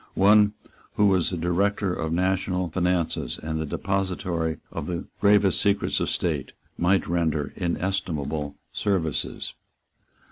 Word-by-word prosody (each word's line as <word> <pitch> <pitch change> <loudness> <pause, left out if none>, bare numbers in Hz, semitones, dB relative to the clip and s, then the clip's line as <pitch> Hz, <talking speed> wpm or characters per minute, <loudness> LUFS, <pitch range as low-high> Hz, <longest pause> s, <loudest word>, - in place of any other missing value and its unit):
One 105 +1 +5 0.4
who 105 - +4
was 95 -4 +3
the 90 - -3
director 95 +3 +1
of 80 -2 -2
the 80 - 0
national 90 -1 0
finances, 85 -8 0
and 80 0 -2
the 80 - -2
depository 90 -3 -1
of 70 - -5
the 85 -1 -3
gravest 100 -2 +4
secrets 100 0 +1
of - - 0
state, - - -1 0.2
might 90 +2 +2
render 80 -4 0
inestimable 85 -5 -2 0.2
services. 85 -8 -1
90 Hz, 130 wpm, -25 LUFS, 80-95 Hz, 0.4 s, One